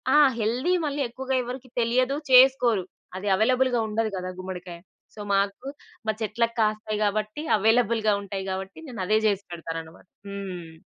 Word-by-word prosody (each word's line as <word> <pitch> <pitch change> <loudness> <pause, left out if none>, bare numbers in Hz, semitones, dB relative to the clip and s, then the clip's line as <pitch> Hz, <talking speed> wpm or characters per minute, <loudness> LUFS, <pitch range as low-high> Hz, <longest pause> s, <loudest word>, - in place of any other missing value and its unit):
ఆ! - - +7 0.2
హెల్దీ 245 +11 +1
మళ్ళీ 290 -1 -1
ఎక్కువగా 265 +2 -3
ఎవరికీ 255 +1 -7
తెలియదు, 250 +4 +2 0.2
చేసుకోరు. 250 -5 +6 0.3
అది 190 +2 -5
అవైలబుల్‌గా 250 +3 +2
ఉండదు 220 +1 0
గదా 185 0 -4
గుమ్మడికాయ. 180 -2 -7 0.3
సో, - - -14
మాకు 200 +6 0 0.4
మా - - +4
చెట్లకు 230 +2 0
కాస్తాయి 215 0 0
గాబట్టి, 215 +7 -1
అవైలబుల్‌గా 225 0 +3
ఉంటాయి 195 -1 -5
గాబట్టి, 190 +6 -5
నేనదే 215 -2 0
జేసి 200 -1 0
పెడతాననమాట. 165 +1 -7 0.2
హ్మ్. 180 -5 -7
215 Hz, 135 wpm, -25 LUFS, 190-245 Hz, 0.4 s, ఆ